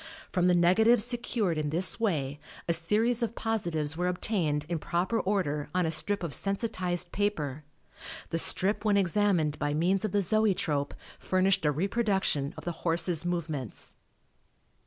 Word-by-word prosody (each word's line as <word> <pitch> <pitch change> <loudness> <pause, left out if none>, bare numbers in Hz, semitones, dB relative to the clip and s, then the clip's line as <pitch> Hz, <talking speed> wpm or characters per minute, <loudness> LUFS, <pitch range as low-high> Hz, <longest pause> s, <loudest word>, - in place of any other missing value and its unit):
From 180 -1 +2
the 180 - +4
negatives 210 +7 +4
secured 235 -8 -1
in 150 -1 -1
this 170 +5 0
way 150 -10 -1 0.3
a 170 - +2
series 215 +9 +1
of 235 0 -2
positives 170 -9 -2
were 180 +2 -1
obtained 175 -5 -1
in 170 -1 -2
proper 180 +8 -1
order 160 -8 -1
on 180 -1 +2
a 160 - 0
strip 205 +3 -1
of 165 -4 -3
sensitized 185 -4 -1
paper. 155 -9 -2 0.7
The 165 - 0
strip 195 +6 +2
when 210 -2 +3
examined 180 -5 +1
by 145 0 -1
means 180 +5 +1
of 215 - -1
the 205 - +2
Zoetrope 180 -9 0 0.2
furnished 185 -2 +1
a 150 - +4
reproduction 190 - 0
of - - -9
the 175 - -1
horse's 170 0 +1
movements. 155 - -4
180 Hz, 155 wpm, -29 LUFS, 160-205 Hz, 0.7 s, the